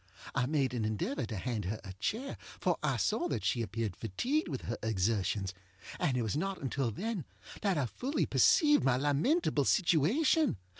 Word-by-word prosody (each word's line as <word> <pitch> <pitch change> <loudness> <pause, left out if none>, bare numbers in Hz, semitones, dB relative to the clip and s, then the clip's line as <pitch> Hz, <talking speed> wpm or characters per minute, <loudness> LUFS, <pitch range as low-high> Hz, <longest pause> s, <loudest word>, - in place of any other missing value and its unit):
I 125 - +1
made 135 -4 +1
an 120 -3 -1
endeavor 110 +4 -2
to 110 - -4
hand 110 -1 -2
her 105 +4 -3
a 95 -3 -8
chair, 225 - -3 0.2
for - - +2
I - - +1
saw 350 - +1
that - - -3
she 120 - +1
appeared 110 -2 -3
fatigued 240 - -1
with 135 -7 -4
her 115 - -3
exertionsŌĆöand 95 +1 -2
it 120 - 0
was 110 +3 -1
not 190 +5 -2
until 135 -2 -1
then 200 - -3 0.4
that 195 -5 +1
I 140 - +1
fully 260 - -1
perceived 295 -2 +5
my 130 -2 +3
lamentable 145 - +2
situation. 200 - +3
130 Hz, 170 wpm, -32 LUFS, -, 0.4 s, perceived